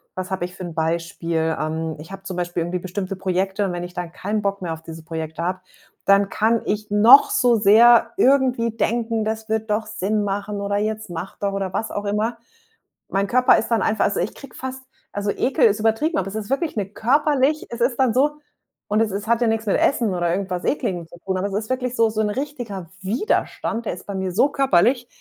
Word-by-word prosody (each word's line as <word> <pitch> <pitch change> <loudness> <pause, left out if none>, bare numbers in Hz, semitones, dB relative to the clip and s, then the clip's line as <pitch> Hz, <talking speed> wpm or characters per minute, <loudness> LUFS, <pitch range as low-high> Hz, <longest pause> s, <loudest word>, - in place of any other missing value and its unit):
was 185 0 -5
habe 185 -2 -1
ich 180 0 -10
für 185 - -8
'n 170 -2 -6
Beispiel? 165 0 -1
Ähm, 160 +1 -2
ich 165 +5 -11
habe 195 0 -9
zum 185 -2 -6
Beispiel 175 -1 -2
irgendwie 180 +1 -3
bestimmte 190 +1 -4
Projekte 190 +2 -1
und 180 - -2
wenn 175 0 -4
ich 175 0 -8
dann 175 -1 -5
keinen 210 +2 -2
Bock 200 -1 -2
mehr 170 -2 -3
auf 160 - -9
diese 165 0 -10
Projekte 160 0 -5
habe, 185 +1 -1 0.5
dann 200 0 +4
kann 225 +1 +1
ich 210 0 -2
noch 235 - +7
so 250 - +3
sehr 225 +4 +6
irgendwie 260 - +3
denken: 230 -1 0
„Das 220 0 -3
würde 220 0 0
doch 215 0 -1
Sinn 210 0 -1
machen,“ 200 +1 -3
oder 200 0 -1
„Jetzt 215 -1 -2
mach 175 +2 -6
doch!“ 200 -1 -1
oder 195 -2 -3
was 220 +3 -2
auch 205 0 -4
immer. 215 +3 -1 0.7
Mein 195 +1 0
Körper 250 +3 +5
ist - - -1
dann 230 -2 +2
einfach 220 -1 +1
also, - - 0
ich 190 - -2
kriege 275 - -12
fast 260 0 -6 0.3
also, 205 0 -1
Ekel 265 0 +2
ist 215 0 +3
übertrieben, 225 +10 +1
aber 190 - -2
es 195 - -6
ist 215 0 -5
wirklich 305 +4 -1
'ne 200 -2 -1
körperlich 285 +5 +1
es 235 0 -7
ist 240 0 +2
dann 255 -4 +3
so 295 +3 +2 0.5
und 215 +2 +2
es 215 -3 +1
ist 200 +2 -4
hat 235 +1 +2
ja 235 - +3
nix 225 0 0
mit - - +3
Essen 230 -8 +2
oder 175 -1 0
irgendwas 185 -1 -2
Ekligem 180 - -1
zu 175 - -14
tun, 190 -1 -1
aber 190 - -1
es 200 - -7
ist 215 +1 -3
wirklich 250 -1 -2
so 225 -1 +3
so 220 0 -1
'n 210 - +1
richtiger 235 - -5
Widerstand, 230 - -1
der - - -1
ist 180 - -10
bei 200 - -4
mir 190 -1 -2
so 265 +8 +3
körperlich, 245 -1 +2
205 Hz, 230 wpm, -22 LUFS, 185-235 Hz, 0.7 s, noch